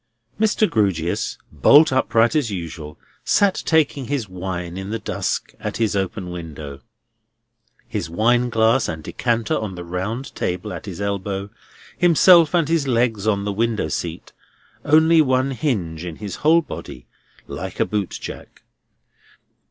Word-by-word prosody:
Mr. 215 0 +3
Grewgious, 95 - 0
bolt 150 0 +6
upright 120 0 +2
as 145 -7 +1
usual, 80 -5 -6 0.3
sat 200 -2 +2
taking 150 -4 +2
his 130 -4 -2
wine 90 -2 -5
in 95 +1 -6
the 115 - -2
dusk - - -3
at - - -4
his 110 -3 0
open 95 -1 -3
window; 75 -5 -8 1.1
his - - -4
wineglass 115 +4 +2
and 80 -2 -5
decanter 115 +3 -1
on 105 -4 -3
the 90 - -7
round 95 +9 -4
table 90 +4 -3
at - - -8
his 95 -2 -7
elbow; 100 0 -3 0.4
himself 170 -1 +5
and 165 -4 +2
his 160 -3 +1
legs 115 -4 +1
on 100 -2 +1
the 100 - -2
window 110 -5 0
seat; - - -5 0.5
only 160 +2 +5
one 130 -1 +1
hinge 100 - -2
in 85 -3 -6
his 100 -2 -6
whole 165 +3 +4
body, - - -9 0.4
like - - -7
a - - +3
bootjack. 105 -3 -5
110 Hz, 140 wpm, -21 LUFS, 90-135 Hz, 1.1 s, bolt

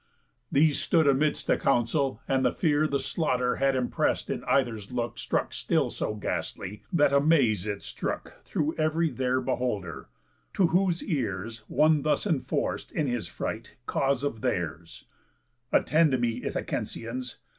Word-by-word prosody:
These 150 +1 +3
stood 165 -2 +3
amidst 145 +2 +2
the - - +2
council; 135 +2 +1
and 135 -1 +2
the 125 - +3
fear 155 -2 +2
The 140 -2 0
slaughter 125 -2 0
had 135 0 +2
impress'd 125 -1 0
in - - -3
either's 115 -6 0
look 120 -1 -3
Stuck - - -1
still - - 0
so 105 - -3
ghastly, 105 -1 -4
that 145 -5 +3
amaze 140 - +3
it 100 -1 -3
strook - - -4
Through 155 +1 -1
ev'ry 155 +1 +2
there 130 +1 0
beholder. 125 - -3 0.5
To 190 - +4
whose 180 -1 +2
ears 115 - -2
One 155 +1 +3
thus 155 +7 +1
enforc'd, 160 -10 -1
in 155 - 0
his 120 -4 -2
fright, 110 +2 -5
cause 135 0 0
of 130 -6 -2
theirs: 85 -9 -3 0.7
"Attend 155 -4 +3
me, 120 -1 -1
Ithacensians! 120 +1 -4
130 Hz, 145 wpm, -28 LUFS, 115-150 Hz, 0.7 s, To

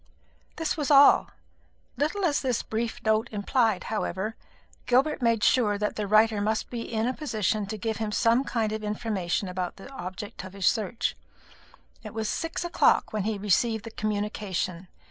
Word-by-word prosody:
This 325 -1 -1
was 295 -3 -2
all. 285 -1 +7 0.7
Little 345 +7 0
as 295 -4 +1
this 255 -4 0
brief 225 +1 -3
note 220 0 +2
implied, 215 0 +1
however, 215 0 -3 0.5
Gilbert 270 +4 +2
made 230 -3 +2
sure 210 -5 +3
that 210 0 -2
the 210 -1 -2
writer 215 0 +4
must 220 +1 -1
be 240 -2 -3
in 220 0 0
a 255 - 0
position 215 -7 -1
to 215 +2 -4
give 220 +1 -2
him 220 -1 -2
some 230 +4 +3
kind 225 -5 -1
of 215 0 -4
information 210 -3 -2
about 180 -1 -3
the 225 +8 -12
object 185 -4 -7
of 185 0 -9
his 195 -2 -3
search. 225 +2 +1 0.9
It 215 -1 -9
was 220 -1 -2
six 330 +6 -3
o'clock 345 - +3
when 210 -2 -1
he 220 -1 -1
received 210 +2 +1
the 230 - -7
communication. 205 -4 -3
220 Hz, 170 wpm, -27 LUFS, 205-235 Hz, 0.9 s, all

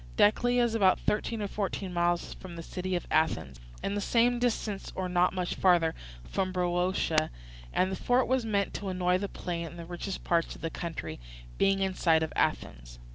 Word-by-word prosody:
Decelea 245 +4 +4
is 235 -2 +1
about 195 -5 +4
thirteen 215 +1 -1
or - - -1
fourteen 195 -2 -3
miles 175 0 +1
from 180 -2 -10
the 165 - -7
city 185 +2 -3
of 175 - -2
Athens, 80 - +1 0.2
and 200 - -1
the 205 - -1
same 240 +3 +3
distance 220 -4 -1
or 185 -1 -2
not 180 0 +3
much 180 -1 -2
further 170 -3 +3 0.3
from 185 - -2
Boeotia; 180 0 +1 0.4
and 185 +1 +1
the - - -1
fort 245 +5 +2
was 260 -1 +2
meant 200 -3 0
to 195 - -4
annoy 180 0 +1
the 200 0 -3
plain 170 -2 -4
and 170 - -10
the 170 - -7
richest 180 +3 -5
parts 170 -1 +1
of - - -13
the 165 - -3
country, 170 - -5 0.4
being 195 0 +3
in 190 -1 +1
sight 160 -3 +3
of 160 - -4
Athens. - - -1
185 Hz, 195 wpm, -29 LUFS, 175-205 Hz, 0.4 s, Decelea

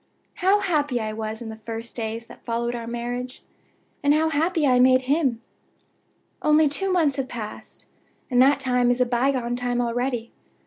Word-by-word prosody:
"How 390 +3 +4
happy 295 -9 0
I 215 -1 -3
was 220 +1 -5
in 225 - -7
the 220 - -6
first 225 +1 -7
days 225 0 -4
that - - -15
followed 235 0 -2
our 235 -1 -5
marriage, 245 +2 -5 0.6
and 290 +1 +4
how 320 +1 +2
happy 320 +1 +1
I 250 -2 +4
made 255 0 +5
him! 260 -4 0 1.0
Only 305 0 +4
two 380 +7 0
months 315 -7 +2
have 270 -1 -2
passed, 215 -3 -8 0.5
and 245 0 +4
that 275 +1 +5
time 250 -2 +2
is 245 +1 +1
a 250 - +4
by 245 +2 +1
gone 245 -2 -2
time 245 0 -1
already! 240 0 -2
250 Hz, 180 wpm, -24 LUFS, 235-285 Hz, 1.0 s, made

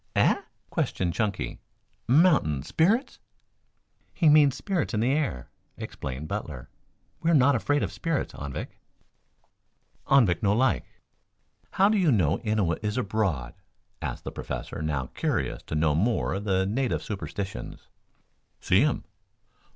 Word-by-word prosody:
"Eh?" - - +3 0.3
questioned 90 -2 -1
Chunky. 105 -1 -2 0.5
"Mountain 130 - +4
spirits?" 210 - +1 1.0
"He 165 -5 +4
means 145 -3 +6
spirits 180 - -2
in - - +1
the 120 +4 +2
air," 140 - -2 0.3
explained 65 +3 -6
Butler. 75 -10 -5 0.5
"We 165 - +1
are 170 - +5
not 140 0 +5
afraid 145 +4 +1
of - - -2
spirits, 165 -4 -2
Anvik." 70 -1 -7 1.3
"Anvik 115 -11 +4
no 100 -2 +3
like." 130 +3 +2 0.9
"How 195 - +4
do 215 0 +2
you 170 -6 +4
know 85 - +2
Innua 105 -7 0
is 105 +1 -1
abroad?" 95 - -1 0.5
asked - - -4
the - - -5
Professor, - - -6
now 75 -4 -1
curious - - -1
to - - -3
know 75 -1 +2
more 110 +10 +1
of 100 +2 -4
the 95 -2 +2
native 125 +6 -1
superstitions. 100 - -6 0.7
"See 95 +7 +3
um." 150 -3 0
105 Hz, 135 wpm, -27 LUFS, -, 1.3 s, means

